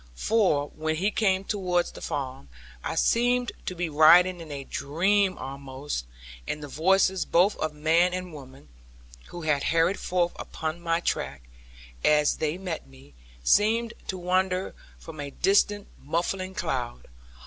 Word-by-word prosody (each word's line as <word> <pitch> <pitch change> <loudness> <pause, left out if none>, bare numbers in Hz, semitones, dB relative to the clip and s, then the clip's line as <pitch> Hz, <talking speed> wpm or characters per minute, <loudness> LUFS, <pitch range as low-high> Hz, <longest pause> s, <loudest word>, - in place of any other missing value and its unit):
For, 155 - +1
when 155 0 -2
we 200 +4 +1
came 195 -3 +1
towards 180 -4 0
the - - -11
farm, 130 - -5 0.3
I - - -3
seemed 245 +1 +2 0.2
to 185 - -3
be 175 0 -2
riding 170 +4 +6
in 160 -2 -9
a 140 -1 -5
dream 185 +9 +1
almost; 135 - -6 0.4
and 150 - -4
the - - -6
voices 190 +5 +2
both 185 +5 +3
of 155 -1 -3
man 165 +4 +3
and 180 -1 -5
women 135 - -12 0.6
(who 175 -1 -8
had 150 -3 +1
hurried 165 +4 +2
forth 175 -1 0
upon 160 +1 -5
my 165 0 0
track), 70 - -2 0.6
as 150 -1 +3
they 155 +2 -1
met 180 - -5
me, 65 +1 -18 0.3
seemed 225 - +3
to 190 - -3
wander 185 +1 0 0.2
from 160 -2 -11
a 145 -1 -4
distant 200 +6 +2 0.2
muffling 185 +5 -2
cloud. 130 - -3
170 Hz, 150 wpm, -26 LUFS, 145-190 Hz, 0.6 s, riding